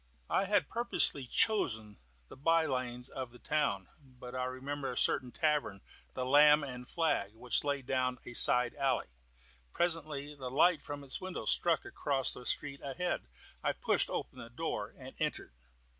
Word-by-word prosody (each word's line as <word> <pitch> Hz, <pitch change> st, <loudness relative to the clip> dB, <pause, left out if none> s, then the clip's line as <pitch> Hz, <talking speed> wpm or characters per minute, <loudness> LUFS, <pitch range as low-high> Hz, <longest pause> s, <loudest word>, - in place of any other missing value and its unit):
I 195 Hz, -, +2 dB
had 205 Hz, +1 st, +1 dB
purposely 230 Hz, -, 0 dB
chosen 115 Hz, -, +1 dB, 0.3 s
the -, -, -12 dB
by 165 Hz, +3 st, +2 dB
lanes 125 Hz, -2 st, -3 dB
of 130 Hz, -2 st, -6 dB
the 125 Hz, -, -15 dB
town, 120 Hz, -11 st, -1 dB, 0.2 s
but 125 Hz, -2 st, -12 dB
I 130 Hz, 0 st, -2 dB
remembered 135 Hz, +1 st, -4 dB
a -, -, -7 dB
certain 125 Hz, -1 st, +1 dB
tavern 150 Hz, -11 st, 0 dB, 0.3 s
the 130 Hz, -, -2 dB
"Lamb 150 Hz, +3 st, +6 dB
and 125 Hz, -2 st, -7 dB
Flag" 145 Hz, -11 st, -1 dB
which 120 Hz, +2 st, +1 dB
lay 140 Hz, -1 st, -1 dB
down 125 Hz, 0 st, -1 dB
a 120 Hz, -, -8 dB
side 125 Hz, +1 st, +7 dB
alley. 135 Hz, -, -1 dB, 0.6 s
Presently 155 Hz, -4 st, -2 dB
the 130 Hz, -3 st, -7 dB
light 155 Hz, +5 st, +3 dB
from 145 Hz, -1 st, -7 dB
its 135 Hz, +5 st, -4 dB
windows 185 Hz, -1 st, -1 dB
struck 170 Hz, -2 st, +2 dB
across 140 Hz, -3 st, -1 dB
the 125 Hz, -, -9 dB
street, 140 Hz, -1 st, -2 dB
ahead. 170 Hz, -, -3 dB, 0.4 s
I -, -, +1 dB
pushed -, -, +1 dB
open -, -, -5 dB
the 115 Hz, -, -9 dB
door 120 Hz, -5 st, -4 dB
and 130 Hz, -1 st, -11 dB
entered. 150 Hz, -, -3 dB
135 Hz, 165 wpm, -32 LUFS, 125-150 Hz, 0.6 s, side